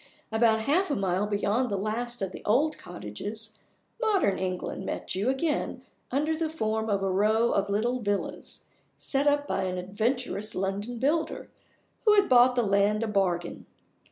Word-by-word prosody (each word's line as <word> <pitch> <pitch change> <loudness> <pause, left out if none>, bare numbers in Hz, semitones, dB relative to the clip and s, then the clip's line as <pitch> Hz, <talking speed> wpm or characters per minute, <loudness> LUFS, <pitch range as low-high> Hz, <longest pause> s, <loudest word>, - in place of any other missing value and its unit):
About 220 0 +3
half 315 - +2
a 285 - +1
mile 195 +1 0
beyond 210 +4 0
the 200 - -1
last 230 +3 -2
of 190 - -2
the - - -9
old 290 +9 +2
cottages, 205 - -6 0.4
modern 390 - +2
England 185 -1 -3
met - - -4
you 200 +7 0
again 285 +4 -1 0.3
under 300 +5 0
the 320 0 -1
form 220 -7 -1
of 200 -1 +1
a 195 - +1
row 215 +4 +3
of 200 0 0
little 235 +5 0
villas, 205 -2 -3 0.3
set 275 +1 +1
up 290 0 +2
by - - -1
an 185 0 -2
adventurous 215 +3 -2
London 200 +5 -2
builder 300 +6 -1 0.5
who 425 -1 +6
had 400 -1 +4
bought 250 0 +6
the 245 - +2
land 200 +1 +2
a - - -1
bargain. 180 -4 -1
220 Hz, 165 wpm, -28 LUFS, 200-255 Hz, 0.5 s, who